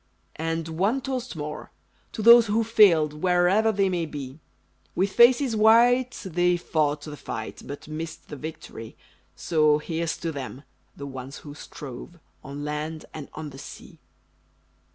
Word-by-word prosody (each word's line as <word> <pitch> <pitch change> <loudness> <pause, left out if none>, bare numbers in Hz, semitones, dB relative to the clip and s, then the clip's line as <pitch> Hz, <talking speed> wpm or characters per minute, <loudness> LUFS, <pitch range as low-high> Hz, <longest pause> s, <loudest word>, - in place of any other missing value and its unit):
And 165 0 -2
one 195 +11 0
toast 260 -4 -4
more! 150 -1 -6 0.4
To 215 - -4
those 235 0 +8
who 220 +2 +1
failed 190 -9 +5
Wherever 185 +5 +3
they 195 -2 +1
may 175 -3 -1
be; 140 -1 -8 0.6
With 195 +2 +1
faces 240 +1 +5
white 240 +4 +4
they 175 0 +1
fought 150 -3 0
the 150 -1 -7
fight, 110 -6 -7
But 145 +1 -9
missed 160 +1 -7
the 150 - -6
victory; 145 -6 -9 0.4
So 155 -2 +2
here's 165 +1 -3
to 165 - -3
them 140 -1 -7 0.3
the 140 - -7
ones 135 0 -8
who 145 - -8
strove 145 +2 -10 0.3
On 140 +2 -7
land 150 +1 -4
and 150 -3 -8
on 155 -1 -6
the 135 - -11
sea! 145 - -11
165 Hz, 150 wpm, -25 LUFS, 150-205 Hz, 0.6 s, those